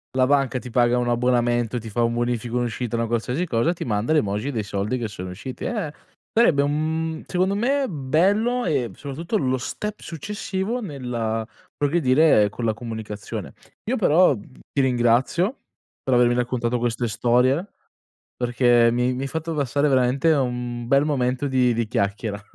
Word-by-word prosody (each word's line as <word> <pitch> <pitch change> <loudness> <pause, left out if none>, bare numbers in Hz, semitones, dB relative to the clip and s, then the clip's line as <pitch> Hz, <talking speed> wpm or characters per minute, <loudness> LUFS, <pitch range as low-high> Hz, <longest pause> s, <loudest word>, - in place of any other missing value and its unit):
la 130 -1 +4
banca 135 -2 +2
ti 125 - -7
paga 120 +1 +3
un 120 0 0
abbonamento, 120 -1 +1
ti 110 0 -8
fa 120 +3 -1
un 115 0 +2
bonifico, 120 0 -1
un'uscita, 120 -1 -2
una 115 0 0
qualsiasi 125 +9 -1
cosa, 140 +5 +1
ti - - -6
manda 110 +4 -1
l'emoji 105 -1 0
dei 110 -4 -2
soldi 100 +5 -2
che 115 -2 -3
sono 95 -3 -7
usciti. 125 +7 -7
Eh 210 - -2 0.4
sarebbe 175 -12 +4
un 145 +1 +1 0.5
mhmm, - - -10
secondo 185 +2 0
me 270 +6 +1
bello 195 - +1
e 130 - 0
soprattutto 165 +9 -3
lo 130 -6 0
step 210 +11 -5
successivo 195 - -4
nella 120 - -3 0.3
progredire 145 -6 +4
con 115 - -7
la 110 -1 +1
comunicazione. 110 -3 -6 0.4
Io 260 - +1
però, 180 -5 +5
mhmm, 100 - -9 0.3
ti 140 - +1
ringrazio 130 - +2 0.4
per 130 - 0
avermi 120 0 +4
raccontato 120 -1 -1
queste 120 0 -1
storie, 125 - +2 0.7
perché 120 -1 +3
mi 125 +1 +1
mi 130 - -4
hai - - -2
fatto 160 +2 -4
passare 145 0 +1
veramente 130 +4 +3
un 120 -4 -1
bel 140 +2 +4
momento 130 -1 0
di 125 -2 +2
di 115 -1 -1
chiacchiera. 100 +1 -2
125 Hz, 165 wpm, -23 LUFS, 120-150 Hz, 0.7 s, però